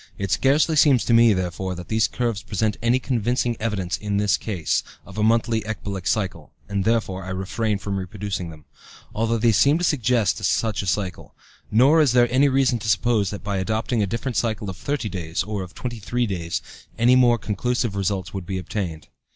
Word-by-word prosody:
It 100 -1 -3
scarcely 150 +4 +3
seems 140 -5 +4
to 120 - +2
me, 115 0 +6
therefore, 95 -1 -2
that 90 0 -8
these 110 0 +2
curves 120 -4 -2
present 105 0 -1
any 120 +2 +3
convincing 120 -1 0
evidence 95 -5 -2
in 105 -1 -2
this 105 -1 +3
case 90 -9 -1 0.2
of 100 +2 -8
a - - +1
monthly 115 0 +2
ecbolic 100 -3 -5
cycle 100 0 -2 0.2
(and, 100 -1 -2
therefore, 110 -5 0
I 95 - -7
refrain 100 +3 -1
from 100 0 -4
reproducing 95 -1 -4
them), 80 -2 -13 0.5
although 115 +1 0
they 115 +1 +3
seem 140 +8 +4
to 175 - -3
suggest 125 - +1
such 110 -2 +1
a 100 - -6
cycle. 95 0 -3 0.3
Nor 135 +9 +5
is 140 -6 +3
there 120 -1 +5
any 140 +2 +4
reason 130 -3 +2
to 110 0 -4
suppose 105 -1 +2
that 100 +1 -7
by 100 -1 -2
adopting 110 +4 -1
a 100 - +1
different 120 +4 -3
cycle 110 -4 -1
of 90 - -11
thirty 140 -1 -2
days, 85 -3 -3
or 105 0 -4
of 95 0 -9
twenty 120 -2 -5
three 120 +4 -1
days, 85 -4 -3 0.3
any 120 +3 +5
more 120 -2 +5
conclusive 115 +1 -2
results 95 -2 -2
would 95 -3 -6
be 95 -1 -2
obtained. 90 -3 -4
105 Hz, 200 wpm, -23 LUFS, 95-120 Hz, 0.5 s, me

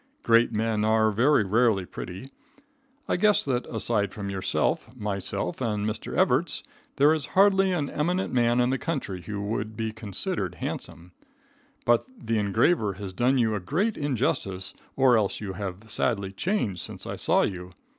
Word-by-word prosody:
Great 115 +1 +4
men 110 0 0
are 110 0 +3
very 125 +4 +4
rarely 105 -1 +2
pretty. 90 +7 -8 0.8
I - - +1
guess 210 +2 +4
that, 125 -3 -1
aside 110 -3 -1
from 100 -1 -5
yourself, 95 +3 -1
myself, 100 - -3
and 105 -4 -1
Mr. 110 0 -4
Evarts, - - +2 0.3
there 145 +3 +5
is 155 -4 -2
hardly 195 -1 +5
an 155 -6 0
eminent 180 +4 -1
man 120 -1 +3
in 125 +1 +3
the 135 - 0
country 135 - -3
who 105 +2 -5
would 105 +1 -3
be 110 -1 -2
considered 105 -3 -3
handsome. 85 +2 -6 0.7
But 120 -1 +3
the 115 - -1
engraver 105 - +2
has 95 0 -7
done 125 +6 +2
you 115 -3 +2
a 105 - -1
great 180 - 0
injustice, 115 -9 -1 0.2
or 130 -3 +5
else 100 -2 -1
you 100 -3 -5
have 100 +2 -6
sadly 100 -6 0
changed 105 - -1
since - - -6
I - - -4
saw - - +3
you. 90 -2 -4
110 Hz, 165 wpm, -26 LUFS, 100-130 Hz, 0.8 s, there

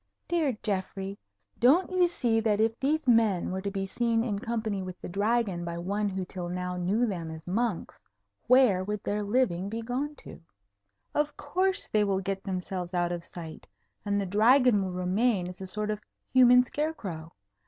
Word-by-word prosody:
"Dear 310 -9 0
Geoffrey, 195 -1 -3 0.4
don't 305 +11 +4
you 365 -1 +4
see 240 -9 +1
that 215 -2 +1
if 225 +1 +1
these 295 +2 0
men 225 -8 +3
were 190 +1 -3
to 200 - -2
be 195 -1 -3
seen 230 +3 0
in 205 -4 -2
company 220 -3 -2
with 185 -1 -7
the - - -7
Dragon 200 -1 0
by 170 0 -4
one 200 +4 -1
who 190 -1 -3
till 180 -1 -6
now 180 0 -3
knew 190 +7 +1
them 175 -7 -3
as 160 0 -9
monks, 210 0 -2 0.5
where 245 -7 +5
would 210 +1 -4
their 205 +1 -1
living 200 -4 0
be 225 +2 -4
gone 270 +6 -3
to? - - -11 0.7
Of 295 0 0
course, 375 +6 0
they 210 -1 +2
will 195 -2 +1
get 195 0 -3
themselves 185 -1 -4
out 175 0 +1
of 175 -1 -4
sight, 165 -2 -9 0.4
and 205 -1 0
the 200 - -1
Dragon 225 +3 +4
will 185 - -3
remain 185 +2 +1
as 180 +1 -9
a 190 - -5
sort 210 +3 -2
of 210 0 -4 0.3
human 250 -1 +7
scarecrow. 215 - -4
205 Hz, 185 wpm, -28 LUFS, 185-240 Hz, 0.7 s, human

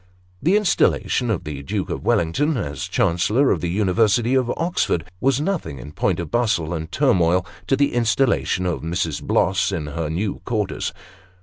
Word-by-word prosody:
The 180 +8 +3
installation 165 - +1
of 100 -5 -1
the 75 -4 -6
Duke 70 - -3
of - - -4
Wellington, 140 - +1
as 70 - -4
Chancellor 105 +11 +2
of 80 - 0
the 85 - -1
University 105 +5 +2
of 130 -2 +2
Oxford, 165 - 0
was 135 +3 +2
nothing, 160 - -2
in 70 +4 -9
point - - 0
of - - -5
bustle 100 -9 +1
and 80 -1 -5
turmoil, 90 0 +2 0.2
to 135 - +3
the 140 +1 +1
installation 115 -5 +1
of 90 -2 -1
Mrs. 80 -1 -2
Bloss 95 +1 +1
in 75 - -3
her 75 +1 -3
new 95 +6 -2
quarters. 105 -5 -2
95 Hz, 170 wpm, -22 LUFS, 80-125 Hz, 0.2 s, The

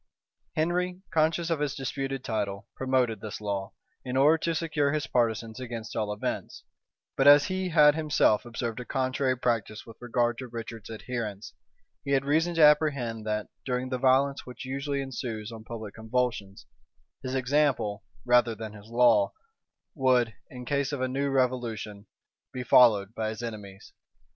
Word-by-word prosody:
Henry, 180 +3 -1
conscious 165 +2 +1
of 165 - +1
his 150 -1 -1
disputed 135 0 -3
title, 100 -4 -3
promoted 130 -4 0
this 110 -2 -6
law, 100 -2 -3 0.3
in 130 0 -3
order 150 +4 +5
to 165 +1 -1
secure 155 -3 0
his 150 -2 -1
partisans 115 -1 -1
against 115 -3 -6
all 105 -1 -1
events; 105 - -4 0.5
but 135 - +3
as 145 0 +8
he 185 0 -2
had 150 -3 +6
himself 150 -8 +2
observed 120 -1 -4
a 125 - -6
contrary 130 0 0
practice 115 -3 -1
with 115 -1 -13
regard 120 0 0
to 130 - -6
Richard's 115 -2 -8
adherents, 110 -2 -5 0.5
he 140 - -1
had 135 0 +2
reason 165 +4 +1
to 165 - +5
apprehend 140 -7 +3
that, 105 0 -2
during 125 0 -2
the 130 -1 -2
violence 135 +2 +3
which 125 +1 -9
usually 140 +1 -2
ensues 120 -5 -5
on 110 -1 -9
public 110 -3 -7
convulsions, 110 -3 -2 0.6
his 130 0 -4
example, 130 -5 +1 0.2
rather 120 -2 +4
than 110 0 -7
his 105 0 -13
law, 115 -4 +4 0.6
would, 125 -5 +2 0.2
in 125 -1 -9
case 140 0 0
of 145 - -3
a 130 - +1
new 140 +2 -1
revolution, 120 -6 -1 0.4
be 125 - -5
followed 110 -5 +5
by 110 -1 -2
his 110 +2 -6
enemies. 105 -4 -8
125 Hz, 160 wpm, -28 LUFS, 110-140 Hz, 0.6 s, as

